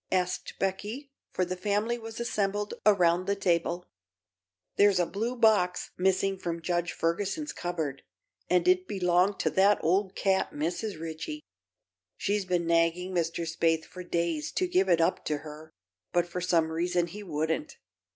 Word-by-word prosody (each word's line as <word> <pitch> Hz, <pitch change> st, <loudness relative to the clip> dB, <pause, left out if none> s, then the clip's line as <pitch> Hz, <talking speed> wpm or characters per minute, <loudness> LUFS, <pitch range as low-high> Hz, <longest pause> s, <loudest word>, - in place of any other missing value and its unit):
asked 180 Hz, -1 st, -1 dB
Becky, 210 Hz, +9 st, -3 dB, 0.2 s
for 185 Hz, -, 0 dB
the 180 Hz, +1 st, -3 dB
family 210 Hz, +5 st, 0 dB
was 225 Hz, 0 st, -8 dB
assembled 205 Hz, -3 st, -1 dB
around 180 Hz, -3 st, +4 dB
the 200 Hz, -, +2 dB
table. 175 Hz, -2 st, 0 dB, 0.9 s
"There's 200 Hz, -2 st, +5 dB
a 175 Hz, -, +3 dB
blue 225 Hz, +8 st, -3 dB
box 210 Hz, -6 st, +3 dB
missing 190 Hz, +1 st, +1 dB
from 170 Hz, -2 st, -3 dB
Judge 175 Hz, -1 st, 0 dB
Ferguson's 200 Hz, -, -2 dB
cupboard, 160 Hz, -6 st, -3 dB, 0.5 s
and 180 Hz, -1 st, +3 dB
it 185 Hz, 0 st, +4 dB
belonged 185 Hz, 0 st, +2 dB
to -, -, +1 dB
that 200 Hz, +2 st, +4 dB
old 190 Hz, +3 st, +1 dB
cat, 190 Hz, -1 st, +1 dB
Mrs. 170 Hz, +5 st, -3 dB
Ritchie. 165 Hz, -, -6 dB, 0.7 s
She's 205 Hz, -1 st, 0 dB
been 180 Hz, -2 st, 0 dB
nagging 170 Hz, +2 st, +1 dB
Mr. 170 Hz, -1 st, -1 dB
Spaythe 165 Hz, 0 st, +1 dB
for 185 Hz, -, -10 dB
days 170 Hz, -3 st, -1 dB
to 370 Hz, -, +1 dB
give 365 Hz, +2 st, +2 dB
it 170 Hz, -, +4 dB
up 165 Hz, -, +1 dB
to 150 Hz, -, 0 dB
her, 155 Hz, +1 st, -10 dB, 0.4 s
but 175 Hz, -1 st, +2 dB
for 180 Hz, +1 st, -4 dB
some 165 Hz, -2 st, +2 dB
reason 175 Hz, +1 st, +1 dB
he 190 Hz, +5 st, -9 dB
wouldn't. 160 Hz, -4 st, -2 dB
180 Hz, 155 wpm, -29 LUFS, 170-200 Hz, 0.9 s, There's